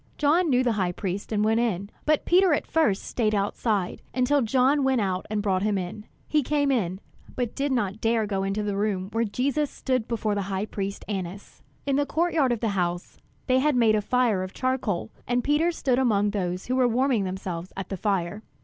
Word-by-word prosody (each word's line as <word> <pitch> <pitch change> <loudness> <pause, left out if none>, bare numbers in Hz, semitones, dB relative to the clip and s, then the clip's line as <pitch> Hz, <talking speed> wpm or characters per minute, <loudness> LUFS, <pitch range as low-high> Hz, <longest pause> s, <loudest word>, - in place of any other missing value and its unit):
John 320 +4 +3
knew 255 -1 +3
the 245 - +2
high 180 -1 0
priest 195 +2 -4
and 210 -1 +1
went 225 +1 +3
in; 200 -4 -1 0.2
but 305 -1 +2
Peter 360 -1 +5
at - - -3
first 305 -12 +1
stayed 215 -3 0
outside, 200 -1 -1
until 265 +3 +3
John 260 +4 +3
went 265 -2 +2
out 190 -3 -1
and 210 -1 -1
brought 190 -3 +1
him 205 0 +1
in. 190 +3 -5 0.2
He 305 - +2
came 285 +1 +1
in, 190 -7 0 0.4
but 245 -3 -2
did 280 0 -1
not 210 -4 -1
dare 225 0 +2
to 215 - -2
go 195 -2 -1
into 195 +2 -1
the 205 -1 -2
room 195 -2 -1
where 230 +1 +1
Jesus 275 +7 0
stood 255 -4 -2
before 220 -3 -1
the 205 - -1
high 195 +1 -1
priest 200 -2 -5
Annas. 195 -1 -6 0.2
In 275 -1 +1
the 290 0 +1
court 340 +2 0
yard 280 -6 +3
of 235 - -1
the 225 - +1
house, 175 -3 -2 0.3
they 255 0 +3
had 295 +1 +2
made 230 -3 +4
a 215 - +2
fire 230 -3 +1
of 185 0 -5
charcoal, 250 -7 -1 0.2
and 245 0 +1
Peter 300 +4 +2
stood 260 -6 0
among 210 -5 +2
those 180 -2 -2
who 255 - -1
were 255 -1 +4
warming 245 -2 +2
themselves 185 -2 -5
at 195 - -5
the 195 - -3
fire. 195 +1 -1
220 Hz, 220 wpm, -26 LUFS, 195-260 Hz, 0.4 s, Peter